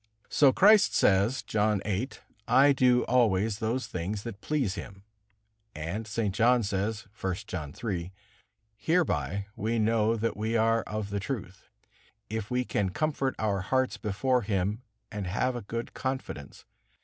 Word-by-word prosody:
So 140 -3 +5
Christ 205 +7 +5
says, 100 +7 +3
John 105 -1 +1
viii: 105 +6 -1 0.4
"I 140 +2 +6
do 125 -2 +4
always 110 -4 +2
those 120 +3 -1
things 100 +4 -4
that 115 -3 -7
please 140 -10 0
Him." 100 -1 -9 0.7
And 85 +9 -4
St. 105 -2 -1
John 120 +2 +4
says, 105 +2 -2 0.2
I. 95 -1 +1
John 80 -9 -5
iii: 90 -5 -2 0.6
"Hereby 135 - 0
we 115 +3 -1
know 110 0 +2
that 115 +1 -1
we 110 +2 -1
are 115 +1 +3
of 105 -1 -4
the 100 - -1
truth, 100 -5 -6 0.6
if 110 -1 -3
we 125 0 0
can 100 -5 0
comfort 140 +4 -1
our 100 -3 0
hearts 130 +6 0
before 125 +5 0
Him 100 +1 -1 0.3
and 105 -3 -4
have 125 +7 0
a 120 - -4
good 115 +3 -5
confidence. 130 - -5
110 Hz, 150 wpm, -28 LUFS, 100-125 Hz, 0.7 s, I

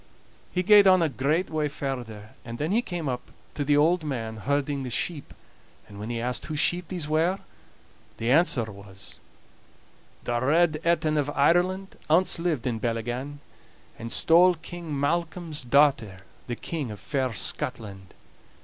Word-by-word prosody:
He 180 - 0
gaed 205 +1 +7
on 185 -2 +6
a 160 - +1
great 150 +7 0
way 155 -1 0
farther, 120 -7 -6
and 115 0 -7
then 155 +6 -2
he 225 +4 +3
came 175 - -5
up 125 -2 -4 0.2
to 145 - -2
the 145 +1 +3
old 165 +3 +3
man 115 -7 -4
herding 140 +4 -1
the 130 - -4
sheep; 150 +5 -2 0.6
and 100 -1 -11
when 105 +2 -6
he 120 -1 -2
asked 125 0 -2
whose 155 -1 -3
sheep 175 +2 +1
these 175 -4 -4
were, 165 +5 +1 0.8
the 115 +2 -1
answer 145 -5 +4
was: 100 -2 -9 1.0
"The 120 -1 -1
Red 155 +2 +3
Etin 155 -2 +2
of 145 0 -1
Ireland 180 +7 +1
Ance 170 +2 +3
lived 165 -8 -1
in 120 -3 -1
Bellygan, 120 +5 -3 0.6
And 115 0 -6
stole 175 +6 +5
King 165 -3 -6
Malcolm's 165 +1 -2
daughter, 120 -7 +2 0.3
The 120 - -3
King 150 -4 -4
of 105 -2 -8
fair 130 0 -1
Scotland. 100 -2 -3
145 Hz, 160 wpm, -26 LUFS, 120-170 Hz, 1.0 s, gaed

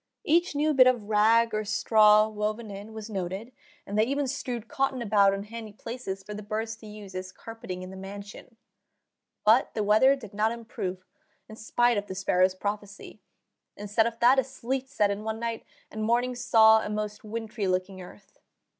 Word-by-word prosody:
Each 340 -2 +2
new 305 +2 +2
bit 255 -2 +7
of 235 -5 +1
rag 225 +2 +4
or 215 0 -1
straw 215 0 +4
woven 215 +1 -3
in 200 +2 -9
was 220 -1 -8
noted, 195 +3 -5 0.3
and 205 +2 -2
they - - +6
even 280 +2 -1
strewed 245 -4 -4
cotton 270 0 -1
about 205 -3 +4
in 195 0 -3
handy 220 0 -9
places 215 -4 -6
for 210 +2 -8
the 210 - -6
birds 220 +2 -4
to 220 - -13
use 210 -2 -10
as 185 0 -6
"carpeting 195 -5 -8
in 185 - -8
the - - -9
mansion." 200 +4 -10 0.9
But 225 +4 +4
the 215 - 0
weather 220 +7 +5
did 220 -8 -12
not 215 +2 +1
improve, 190 -6 -6 0.4
in 220 - -11
spite 240 +1 +1
of 205 - -9
the 190 - -6
sparrow's 185 -1 +2
prophecy; 205 +1 -6 0.6
instead 210 +2 +1
of 230 0 -6
that, 250 +3 +6
a - - +2
sleet 265 +1 -4
set 210 -8 +1
in 200 +1 -4
one 220 0 -3
night, 230 -1 -4 0.3
and 215 - -5
morning 240 +3 +1
saw 220 -3 +5
a - - -4
most 210 0 -4
wintry 220 -1 -4
looking 185 +1 -2
earth. 190 +2 -15
215 Hz, 190 wpm, -27 LUFS, 205-235 Hz, 0.9 s, bit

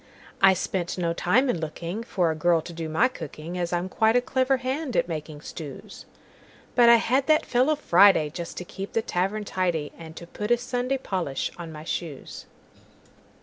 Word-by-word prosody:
I 190 -1 +7
spent 180 0 -3
no 170 -2 0
time 225 +11 +2
in 215 -9 0
lookingFor 170 +3 -2
a - - -3
girl 170 +1 +3
to 170 - -9
do 165 -1 -5
my 160 +10 +3
cooking, 165 - -8
As 175 -1 -2
I'm 175 +1 -1
quite 220 +4 +2
a - - +6
clever 260 +1 +1
hand 260 +1 -3
at - - +2
making 155 -2 -6
stews; 150 -3 -9 0.7
But 240 -1 +6
I 235 - +9
had 255 +4 +1
that 310 0 +4
fellow 260 +5 +2
Friday, 190 - +5
Just 170 +1 -7
to 180 - -5
keep 195 +2 -7
the 225 - +1
tavern 195 +4 -1
tidy, 175 -6 -1
And 160 -1 -11
to 170 - -9
put 210 +5 -6
a 240 - +4
Sunday 250 +2 -2
polish 180 - -3
on 170 -2 -8
my 155 -1 -9
shoes. 160 -3 -6
180 Hz, 190 wpm, -25 LUFS, 165-240 Hz, 0.7 s, I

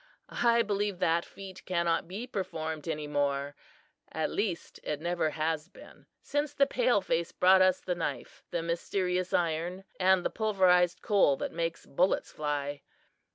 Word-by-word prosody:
"I 235 -1 +4
believe 205 -2 -1
that 170 -1 +1
feat 190 -1 -11
cannot 170 -2 0
be 200 +7 -5
performed 160 - -4
any 155 -2 -2
more; 145 -1 -1 0.6
at 160 - -2
least, 195 -5 -3
it 150 -1 -3
never 170 -1 0
has 155 +2 -2
been - - -16 0.2
since 290 0 -2
the 275 - +5
pale 245 -5 +2
face 170 -2 -1
brought 185 +1 +5
us 185 -1 +4
the 180 - -1
knife, 175 -2 -5
the 170 - -2
'mysterious 180 +2 -1
iron,' 170 +3 -1 0.2
and 185 -1 +4
the - - 0
pulverized 185 -5 +3
coal 195 - +4
that - - -3
makes 165 0 -3
bullets 180 +7 +1
fly. 145 -1 -3
175 Hz, 155 wpm, -30 LUFS, 160-190 Hz, 0.6 s, the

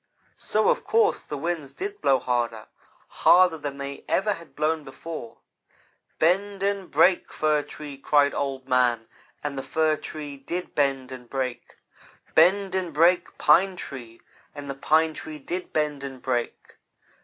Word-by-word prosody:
"So, 215 0 +1
of - - +1
course, 445 -1 +2
the 150 - -6
winds 160 -2 -3
did 405 +1 -6
blow 135 - +4
harder 120 -3 -2 0.4
harder 180 -3 +4
than 140 -1 -5
they 140 0 -6
ever 210 +2 +2
had 170 -3 -13
blown 155 +1 0
before. 135 -3 -8 0.8
"'Bend 195 +4 +1
and 200 -2 -1
break, 175 +5 +3
Fir 155 -1 +1
Tree!' 145 -1 -9
cried 145 0 +3
Old 135 -2 -3
man, 125 -3 +2 0.4
and 145 -1 -3
the - - -2
Fir 155 +2 +1
Tree 145 -2 -7
did 170 +6 -5
bend 135 -2 0
and 125 -2 -10
break. 130 -3 -4 0.6
'Bend 190 +4 +4
and 185 -3 -1
break, 170 +4 +3
Pine 185 +5 +4
Tree!' 120 -9 -8 0.4
and 145 -1 -7
the 140 - -3
Pine 155 +3 +2
Tree 155 0 -7
did 175 +6 -5
bend 150 -2 -1
and 135 -2 -7
break. 120 -2 -3
150 Hz, 155 wpm, -25 LUFS, 135-175 Hz, 0.8 s, blow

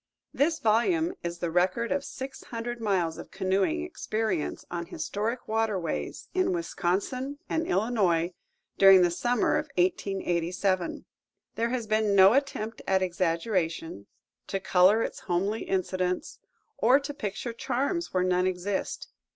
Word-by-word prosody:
This 320 +4 +2
volume 320 - +2
is 170 0 -3
the 170 -1 -3
record 185 +7 +1
of 280 0 0
six 265 0 -7
hundred 235 0 -5
miles 185 -7 0
of - - -9
canoeing 195 - 0
experiences 220 - -2
on 170 -1 -4
historic 210 +11 -3
waterways 215 -7 -2
in 370 0 +1
Wisconsin 255 - -2
and 325 +1 -1
Illinois 185 -5 +1 0.5
during 195 -2 +8
the 175 - +3
summer 245 - +1
of 300 0 -6
1887. 180 0 0 0.5
There 230 +1 -1
has 245 -2 -2
been 215 -1 +1
no 190 +2 +8
attempt 240 -5 -1
at 190 0 +3
exaggeration, 170 - -1 0.4
to 195 - -2
color 190 +4 +4
its - - -4
homely 195 +4 -1
incidents, 185 -1 -2 0.4
or 255 +4 +5
to 290 +1 -6
picture 230 -2 -4
charms 275 +9 -2
where 185 -1 +1
none 180 0 +2
exist. 185 +2 -3
200 Hz, 135 wpm, -28 LUFS, 180-245 Hz, 0.5 s, during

